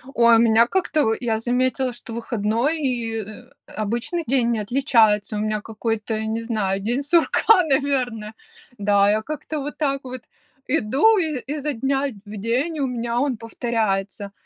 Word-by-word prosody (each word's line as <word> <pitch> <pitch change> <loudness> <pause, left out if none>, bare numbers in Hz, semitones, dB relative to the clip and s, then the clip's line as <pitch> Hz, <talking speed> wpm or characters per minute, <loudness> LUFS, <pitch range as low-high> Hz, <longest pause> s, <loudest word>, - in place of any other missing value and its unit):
Ой, 235 0 +6
у - - +3
меня 230 0 +5
как-то, 320 -2 +1
в 225 0 +1
я 225 -3 0
заметила, 255 +2 0
что 235 0 -10
выходной 235 +5 -1
и, 240 -5 -2
э, 215 +5 -12 0.3
обычный 235 - -2
день 240 -2 +2
не 230 - 0
отличается. 220 -3 +2
У - - -2
меня 215 0 -1
какой-то, 220 0 -3
не 220 +1 -2
знаю, 210 -4 -1
день 240 +7 -1
сурка, 345 +6 +4
наверно, 265 -7 -1 0.4
да. 200 -1 +3
Я 215 +1 +1
как-то 305 +4 -5
вот 290 +1 -6
так 275 -3 0
вот 255 -1 -7 0.5
иду, 295 - +3
и 315 -7 -1
изо 300 0 -3
дня 270 +3 0 0.2
в 210 +1 -8
день, 245 +10 -1
и - - -4
у 275 - 0
меня 240 -1 -2
он 265 -2 0
повторяется. 210 -4 -2
235 Hz, 165 wpm, -22 LUFS, 220-275 Hz, 0.5 s, Ой